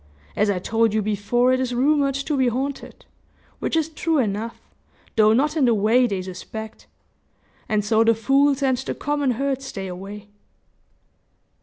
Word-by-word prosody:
As 210 Hz, 0 st, +2 dB
I 200 Hz, -, +1 dB
told 225 Hz, +3 st, +1 dB
you 215 Hz, -, +2 dB
before, 215 Hz, +5 st, +1 dB
it 255 Hz, -, +1 dB
is 250 Hz, -1 st, -2 dB
rumored 275 Hz, +1 st, +2 dB
to 275 Hz, +2 st, -2 dB
be 260 Hz, -2 st, +2 dB
haunted, 265 Hz, +3 st, -4 dB, 0.5 s
which -, -, -2 dB
is 320 Hz, -2 st, +1 dB
true 320 Hz, 0 st, -1 dB
enough, 225 Hz, -2 st, -2 dB, 0.6 s
though 215 Hz, -1 st, +5 dB
not 290 Hz, +7 st, +2 dB
in 295 Hz, -5 st, +3 dB
the 235 Hz, -2 st, +3 dB
way 225 Hz, +5 st, +3 dB
they 195 Hz, -4 st, -3 dB
suspect; 215 Hz, +4 st, -8 dB, 0.8 s
and 210 Hz, -2 st, 0 dB
so 220 Hz, +1 st, +3 dB
the 230 Hz, 0 st, +4 dB
fools 275 Hz, +4 st, +2 dB
and 260 Hz, -2 st, +2 dB
the 265 Hz, -, -4 dB
common 290 Hz, -1 st, -1 dB
herd 275 Hz, 0 st, -1 dB
stay 215 Hz, -8 st, -6 dB
away." 195 Hz, +3 st, -8 dB
240 Hz, 165 wpm, -22 LUFS, 215-275 Hz, 0.8 s, though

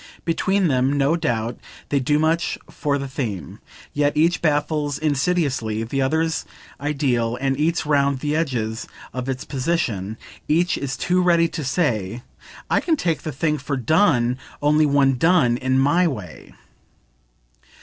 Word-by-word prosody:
Between 190 Hz, +3 st, +1 dB
them, 130 Hz, -1 st, +2 dB
no 140 Hz, +3 st, +3 dB
doubt, 120 Hz, -8 st, -2 dB, 0.3 s
they 140 Hz, -, +2 dB
do 145 Hz, +3 st, +1 dB
much 160 Hz, +2 st, +1 dB
for 145 Hz, -2 st, -1 dB
the 140 Hz, 0 st, -4 dB
theme; 110 Hz, -, -5 dB, 0.3 s
yet 145 Hz, 0 st, +1 dB
each 165 Hz, +2 st, +3 dB
baffles 150 Hz, -2 st, 0 dB
insidiously 140 Hz, -7 st, 0 dB
the 135 Hz, +4 st, -2 dB
other's 160 Hz, +4 st, 0 dB, 0.4 s
ideal 130 Hz, -5 st, 0 dB
and 135 Hz, 0 st, 0 dB
eats 160 Hz, +1 st, +1 dB
round 140 Hz, -2 st, +2 dB
the 150 Hz, +3 st, -2 dB
edges 120 Hz, -8 st, -2 dB, 0.3 s
of 125 Hz, +1 st, -4 dB
its 135 Hz, +2 st, -3 dB
position; 125 Hz, -, -2 dB, 0.3 s
each 170 Hz, +4 st, +2 dB
is 135 Hz, -1 st, -4 dB
too 180 Hz, +1 st, +1 dB
ready 170 Hz, -2 st, +4 dB
to 155 Hz, -, -5 dB
say 120 Hz, -, -1 dB, 0.4 s
"I -, -, +2 dB
can 330 Hz, -, +1 dB
take 170 Hz, -, -1 dB
the 155 Hz, -, -4 dB
thing 150 Hz, +2 st, -1 dB
for 140 Hz, +1 st, -3 dB
'done' 130 Hz, -, +2 dB, 0.2 s
only 150 Hz, +1 st, +3 dB
when 135 Hz, -2 st, +3 dB
done 160 Hz, -8 st, +4 dB
in 130 Hz, +1 st, 0 dB
MY 145 Hz, +7 st, +3 dB
way." 105 Hz, -, -7 dB
145 Hz, 150 wpm, -22 LUFS, 125-160 Hz, 0.4 s, ready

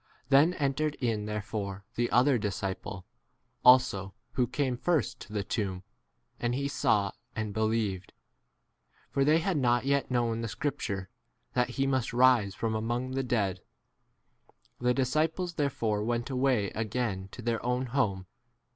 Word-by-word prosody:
Then 145 Hz, +6 st, +5 dB
entered 145 Hz, +1 st, 0 dB
in 110 Hz, -4 st, -1 dB
therefore 100 Hz, -2 st, -4 dB
the 120 Hz, 0 st, 0 dB
other 125 Hz, 0 st, +4 dB
disciple 95 Hz, -2 st, -4 dB, 0.6 s
also 100 Hz, -6 st, +5 dB, 0.2 s
who 125 Hz, -2 st, +1 dB
came 130 Hz, 0 st, -1 dB
first 155 Hz, +2 st, 0 dB
to -, -, -11 dB
the 105 Hz, -2 st, -1 dB
tomb, 95 Hz, -3 st, -3 dB, 0.6 s
and 120 Hz, 0 st, 0 dB
9 130 Hz, -, -1 dB
he 140 Hz, -, -1 dB
saw 105 Hz, -7 st, +1 dB, 0.2 s
and 110 Hz, -2 st, -3 dB
believed; 110 Hz, -3 st, -1 dB, 1.0 s
for 140 Hz, -, +2 dB
they 150 Hz, +3 st, +5 dB
had 170 Hz, 0 st, 0 dB
not 120 Hz, -2 st, +2 dB
yet 140 Hz, 0 st, +1 dB
known 120 Hz, -2 st, 0 dB
the 115 Hz, -, -2 dB
scripture, 105 Hz, -5 st, -3 dB, 0.4 s
that 125 Hz, 0 st, +1 dB
he 135 Hz, -, +2 dB
must 130 Hz, -3 st, 0 dB
rise 120 Hz, -5 st, +4 dB
from 115 Hz, -1 st, -1 dB
among 120 Hz, +4 st, -2 dB
[the] 135 Hz, +1 st, 0 dB
10 130 Hz, -, -6 dB
dead. 100 Hz, -6 st, 0 dB, 1.2 s
The 125 Hz, 0 st, +2 dB
disciples 155 Hz, +7 st, 0 dB
therefore 115 Hz, -9 st, 0 dB
went 120 Hz, +3 st, -1 dB
away 125 Hz, -6 st, +1 dB
again 110 Hz, -3 st, -2 dB
to 125 Hz, -, -8 dB
their 115 Hz, -1 st, -1 dB
own 125 Hz, +1 st, 0 dB
11 130 Hz, -2 st, -5 dB
[home. 100 Hz, -9 st, 0 dB
120 Hz, 155 wpm, -29 LUFS, 105-135 Hz, 1.2 s, Then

